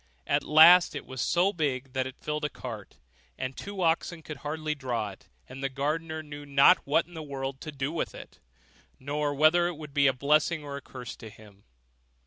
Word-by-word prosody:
At - - +1
last 170 +4 +7
it - - -5
was 130 -1 -6
so 180 +4 +2
big 135 -6 -2
that 130 -1 -1
it 130 - -9
filled 150 0 -4
a 150 - 0
cart, 115 -8 -9 0.4
and 130 0 -4
two 200 -2 -5
oxen 165 0 0
could 155 - -7
hardly 155 +1 -3
draw 120 -7 -3
it; 95 - -17 0.2
and 135 - -9
the 135 - 0
gardener 155 +4 -3
knew 145 -1 -9
not 140 +5 +5
what 150 +4 +2
in 175 - -18
the 160 - -6
world 135 -2 -5
to 155 - -6
do 140 0 -3
with 165 - -3
it, - - -12 0.6
nor 145 +2 -2
whether 155 +4 +4
it 175 -3 -5
would 150 -2 -10
be 140 -1 +4
a - - +5
blessing 150 +4 +1
or 140 -1 -6
a 140 - -6
curse 125 -2 -9
to 110 - -10
him. 105 -2 -17
145 Hz, 210 wpm, -28 LUFS, 130-160 Hz, 0.6 s, last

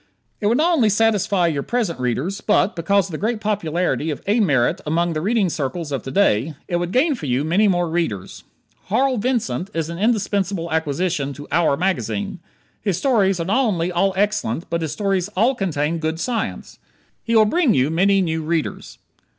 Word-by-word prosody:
It 205 - 0
would 235 +3 +3
not 340 +3 +3
only 235 -8 +3
satisfy 205 -3 +2
your 155 -4 0
present 220 - -2
readers, 130 - -2
but, 210 0 +2
because 195 +3 +2
of - - -11
the 155 - -5
great 225 +1 -1
popularity 180 -6 -1
of 150 - -3
A. 210 +4 +2
Merritt 140 - +2
among 170 +2 0
the 155 - -2
reading 210 +1 +1
circles 155 0 -3
of 135 -4 -2
to 135 - -7
day, 150 - +2
it 175 - 0
would 175 0 -2
gain 290 - +3
for 170 - -6
you 130 +2 +1
many 185 +7 +3
more 175 -3 +1
readers. 160 - -3 0.4
Harl 255 +5 +1
Vincent 205 - -1
is 165 0 -2
an 170 - -6
indispensable 200 -5 0
acquisition 160 -1 -1
to 145 +1 -10
"our" 160 -4 +2
magazine. 195 +1 -2 0.4
His 195 -5 -1
stories 195 -5 +2
are 165 - -2
not 230 +9 +2
only 180 -7 0
all 190 +2 +1
excellent 190 - 0
but 170 0 0
his 160 -3 -2
stories 195 +2 -1
all 235 +7 +4
contain 165 - -1
good 160 +1 -2
science. 230 +2 -3 0.4
He 230 - -1
will 220 -1 +6
bring 295 +1 +2
you 130 +4 +2
many 195 +4 +3
new 160 -2 -1
readers. 160 0 -3
180 Hz, 190 wpm, -21 LUFS, 160-210 Hz, 0.4 s, will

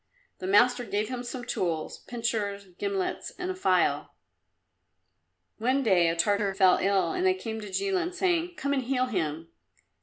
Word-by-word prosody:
The 185 - -4
master 245 +5 +4
gave 210 -1 -2
him 250 -1 -4
some 245 0 -6
tools 165 -7 -2
pincers, 220 -4 -2
gimlets 200 -2 -2
and 365 0 -3
a - - -5
file. 375 - +1 1.4
One 260 +5 +1
day 185 -7 +4
a 165 - +1
Tartar 200 +3 +1
fell 190 -2 +5
ill, 195 0 +2
and 370 -1 -2
they 375 0 +4
came 225 -11 -5
to 210 - -7
Jilin, 370 - 0
saying, 355 -2 0
"Come 280 -2 -1
and 270 - +1
heal 255 0 0
him." 165 -8 -3
230 Hz, 160 wpm, -28 LUFS, 195-275 Hz, 1.4 s, fell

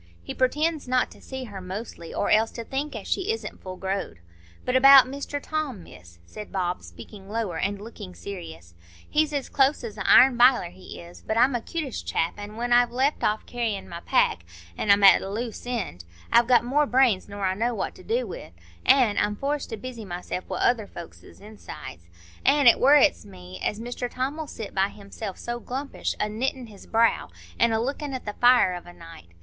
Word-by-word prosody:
He - - -6
pretends 300 +3 0
not 255 0 +1
to - - -16
see 265 -1 -7
her 205 -6 -8
mostly, 185 -2 -7
or - - -1
else 220 +1 +4
to 230 - -6
think 275 +5 -4
as - - -7
she 385 +3 0
isn't 450 - -7
full 185 -1 -7
growed. 190 - -3 0.5
But 250 - 0
about 270 0 +9
Mr 280 +2 -5
Tom, 285 - -4
Miss," 85 - -15
said 210 - -10
Bob, 180 -2 -2
speaking 200 -2 -12
lower 210 -6 -2
and 200 +1 -1
looking 205 -3 -10
serious, 85 - -9 0.3
"he's 305 0 +1
as 285 -2 -2
close 275 0 +2
as 225 -3 -7
a - - -2
iron 255 -1 +7
biler, 245 -8 +5
he 185 - -11
is; 170 +1 -12
but 220 - -3
I'm 255 +3 +4
a 240 - -1
'cutish 305 -2 -5
chap, 165 - -1
an' 205 +1 -8
when 240 +1 -1
I've 245 0 +5
left 265 +4 0
off 215 +1 0
carrying 225 -5 -3
my 170 - -7
pack, 90 - +1 0.3
an' 210 - -3
am 200 0 +5
at 195 - +8
a 195 - -5
loose 230 +3 -5
end, 195 - -4 0.3
I've 235 0 +5
got 245 -1 +4
more 290 +4 +2
brains 245 -8 +2
nor 200 -1 -4
I 185 - +1
know 235 +4 -1
what - - -3
to - - -15
do 475 +3 -1
wi', - - -9 0.3
an' 255 -6 +4
I'm 205 0 0
forced 285 +5 -3
to 225 - -5
busy 245 0 -8
myself 180 -1 -5
wi' - - -3
other 225 -4 +1
folks's 170 - -12
insides. 195 - -11 0.3
An' 290 -1 +4
it 235 - +7
worrets 270 - +5
me 90 -1 -11
as 210 - -1
Mr 245 +1 -4
Tom'll 280 +6 -3
sit 225 -6 -8
by 195 0 +2
himself 200 -1 -8
so 240 0 -5
glumpish, 270 +4 -4
a 210 - 0
knittin' 245 +3 -3
his 205 -2 -14
brow, 230 0 +2 0.3
an' 235 - +4
a 220 - +1
lookin' 275 +3 -3
at 255 - -7
the 210 - -4
fire 245 -5 +5
of 175 0 -8
a 175 - -11
night. 165 - -13
230 Hz, 210 wpm, -25 LUFS, 195-260 Hz, 0.5 s, about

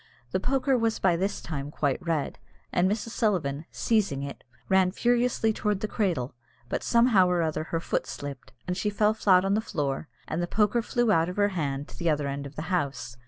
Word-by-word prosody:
The - - +1
poker 270 +4 +1
was 230 -2 +1
by 180 -3 +3
this 195 +4 -1
time 145 -3 -4
quite 145 +1 -1
red, 165 -4 -1 0.3
and 180 +1 +3
Mrs. 215 +2 -2
Sullivan, 170 - 0
seizing 200 -12 0
it, 140 0 -7 0.2
ran 190 -1 +4
furiously 240 0 +2
towards 210 -2 -1
the 215 - -1
cradle; 175 - -1 0.4
but - - -1
somehow 235 -6 +4
or 175 -1 +2
other 155 -1 -1
her 165 - -2
foot - - -2
slipped, 140 -2 -7
and 180 - -2
she 200 +3 0
fell 210 +1 +2
flat 190 -4 +4
on 195 - +2
the 215 - +2
floor, 145 -7 -2 0.2
and 160 +3 -2
the 175 - -1
poker 210 +4 +2
flew 240 -1 +1
out 165 -3 +3
of 180 - -6
her 205 0 +3
hand 145 -6 -2
to - - -12
the 170 -2 +1
other 150 -2 +1
end 140 0 -4
of 140 - -14
the 155 - -4
house. 140 -7 -2
180 Hz, 215 wpm, -27 LUFS, 150-210 Hz, 0.4 s, ran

